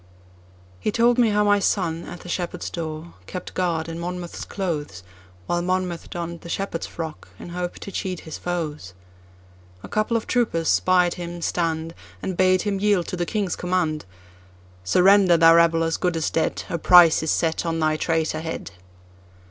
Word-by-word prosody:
He 215 - -1
told 240 +2 +4
how 210 -2 +3
my 205 0 +4
son, 170 -4 0
at 175 - -9
the - - -11
shepherd's 180 0 -3
door, 160 0 -6
kept 180 - -7
guard 170 -3 -1
in 165 0 -6
Monmouth's 175 0 -5
clothes, 150 - -4 0.4
While 175 - 0
Monmouth 180 -1 -2
donned 170 -1 -5
the 170 - -10
shepherd's 195 -2 -3
frock, 160 -2 -7
in - - -9
hope 175 0 -4
to 200 - -8
cheat 185 -2 -4
his 160 - -8
foes.A 90 - -8
couple 215 +2 0
of 225 - -5
troopers 215 -10 0
spied 180 -1 +3
him 175 0 -6
stand, 165 -1 -1 0.3
And 185 - -4
bade 185 0 +3
him 200 -2 -1
yield 200 -4 +2
to - - -3
the 175 -1 -2
King's 205 -4 -1
command:"Surrender, 95 - +1
thou 165 0 +7
rebel 165 0 +4
as 165 0 0
good 180 -2 0
as 160 - -1
dead,A 165 +1 -1
price 175 -1 +7
is 160 - -2
set 165 +1 +1
on 165 -1 -1
thy 155 -1 +2
traitor 160 0 0
head!" 160 -11 -5
170 Hz, 165 wpm, -23 LUFS, 160-180 Hz, 0.4 s, thou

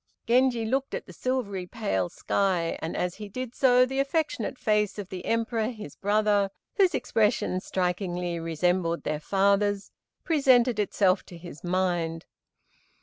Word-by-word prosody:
Genji 240 -1 +3
looked 265 +4 -1
at - - -5
the - - -12
silvery 205 -8 -2
pale 95 - -1
sky, 185 -4 0
and 160 - -3
as 180 -1 -1
he 210 0 -9
did 255 +3 -5
so 250 -1 +5
the 270 +1 -3
affectionate 275 -4 -1
face 210 -3 +1
of 200 -2 -6
the 185 -1 -6
Emperor, 230 -1 0
his 215 - -7
brother, 205 -1 +2 0.3
whose 380 -4 +4
expression 210 -4 +1
strikingly 180 -2 -2
resembled 170 +1 0
their 150 0 -2
father's, 200 +3 +1 0.3
presented 255 -7 +3
itself 195 -2 +2
to 175 - -10
his 170 -3 -11
mind. 175 -2 -1
205 Hz, 145 wpm, -27 LUFS, 180-240 Hz, 0.3 s, so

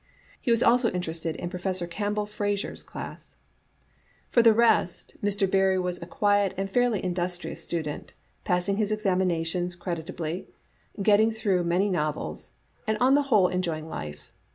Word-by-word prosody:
He 255 - -2
was 230 0 +4
also 240 0 +4
inter 180 -2 -3
ested 165 0 -3
in 175 - -5
Professor 185 -1 -2
Campbell 205 +4 -2
Eraser's 205 -1 -2
class. - - -8 0.9
For 240 - +6
the 230 -1 +7
rest, 225 -5 +2
Mr. 200 -1 +1
Barrie 190 0 +3
was 180 -1 -2
a 170 - -7
quiet 205 0 +2
and 195 0 -2
fairly 245 -2 +2
indus 180 -1 -1
trious - - -7
student, 155 -3 -4 0.3
passing 180 +1 0
his 215 -1 0
exa*minations 180 -4 0
creditably, 170 -1 -4 0.6
getting 215 +2 +5
through 200 -5 0
many 180 +4 +2
novels, 155 -4 -3 0.3
and 220 0 +1
on 255 +4 +4
the 290 - +5
whole 205 -7 +5
enjoy 180 -3 -1
ing 155 +1 -9
life. 75 - -7
185 Hz, 155 wpm, -27 LUFS, 175-210 Hz, 0.9 s, the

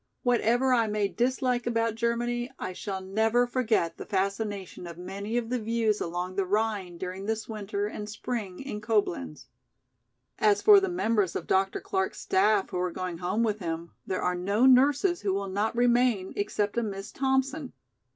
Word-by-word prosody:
Whatever 245 +1 +3
I 230 -2 +3
may 210 -1 0
dislike 245 +1 0
about 230 -1 +1
Germany, 240 +1 -1
I 185 - -4
shall 190 0 -5
never 220 +5 +2
forget 230 -9 0
the - - -7
fascination 200 -2 -2
of 170 -1 -9
many 200 +5 -4
of 240 -1 -2
the 250 - +1
views 225 -1 0
along 175 +2 -3
the 195 - +3
Rhine 200 -2 -1
during 185 +2 -5
this 220 0 -2
winter 205 -2 -3
and 210 0 -5
spring 210 -3 -4
in 265 -6 -5
Coblenz. 200 - -1 0.9
"As 205 -1 +4
for 415 - +8
the 390 -1 -1
members 225 - +1
of - - -3
Dr. 190 0 +1
Clark's 190 0 -2
staff 205 +1 +2
who 180 - -2
are 180 0 0
going 180 -1 -5
home 185 +6 0
with 215 -2 0
him, 165 -2 -4 0.2
there 185 - -2
are 180 - +1
no 200 +7 +1
nurses 285 +7 +4
who 195 -2 0
will 200 0 -2
not 205 +4 -1
remain 240 -5 +2
except 205 +2 -1
a - - 0
Miss 195 -3 -5
Thompson. 265 +1 0
210 Hz, 175 wpm, -28 LUFS, 190-240 Hz, 0.9 s, for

